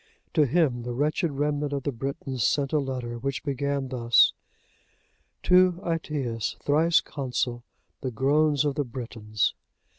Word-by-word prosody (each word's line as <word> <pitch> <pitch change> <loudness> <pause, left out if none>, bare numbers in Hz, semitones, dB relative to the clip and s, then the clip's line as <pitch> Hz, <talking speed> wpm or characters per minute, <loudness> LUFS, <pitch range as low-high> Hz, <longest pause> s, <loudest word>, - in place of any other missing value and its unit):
To 150 -2 +4
him 140 -5 +2
the 120 0 -5
wretched 155 +5 +1
remnant 145 0 -1
of 140 -2 -2
the 145 - -1
Britons 135 0 -4
sent 140 +4 +1
a 155 - +4
letter, 125 -4 -4
which 135 +1 -3
began 140 -1 -2
thus:—"To 170 +8 +1
Aetius, 145 -9 -2
thrice 160 +3 +3
Consul, 125 -3 -3 0.4
the 130 - -2
groans 145 +4 +2
of 145 - +1
the 145 - -1
Britons." 115 -4 -2
140 Hz, 130 wpm, -26 LUFS, 125-150 Hz, 0.4 s, To